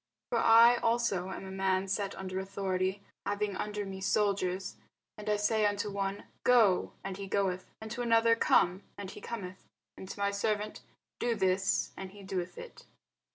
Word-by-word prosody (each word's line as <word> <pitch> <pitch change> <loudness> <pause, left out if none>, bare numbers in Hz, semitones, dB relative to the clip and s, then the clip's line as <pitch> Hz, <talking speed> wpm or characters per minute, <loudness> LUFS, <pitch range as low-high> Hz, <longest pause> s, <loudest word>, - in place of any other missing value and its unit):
For - - +2
I 230 +2 +7
also 230 -6 +1
am 190 - -6
a 190 - -7
man 190 0 0
set 195 +1 -2
under 190 0 -4
authority, 190 0 -2 0.2
having 205 0 -1
under 210 +1 -3
me 190 0 -7
soldiers, 195 -2 0 0.4
and 210 0 -6
I 210 - +3
say 215 +1 +1
unto 205 0 -2
one, 195 0 -2 0.2
Go, 225 -7 +4
and 190 -1 -5
he 200 -1 -6
goeth; 190 -2 0
and 220 0 -8
to 245 - -3
another, 230 -1 +4
Come, 185 -4 +3 0.2
and 200 -2 -6
he - - -10
cometh; 185 -5 -6 0.3
and 190 - -10
to - - -7
my 200 0 +1
servant, 210 +1 -1 0.4
Do 240 -1 +1
this, 190 -1 +1
and 190 0 -7
he 205 -1 -12
doeth 185 -2 -4
it. 485 - -11
200 Hz, 175 wpm, -31 LUFS, 190-210 Hz, 0.4 s, I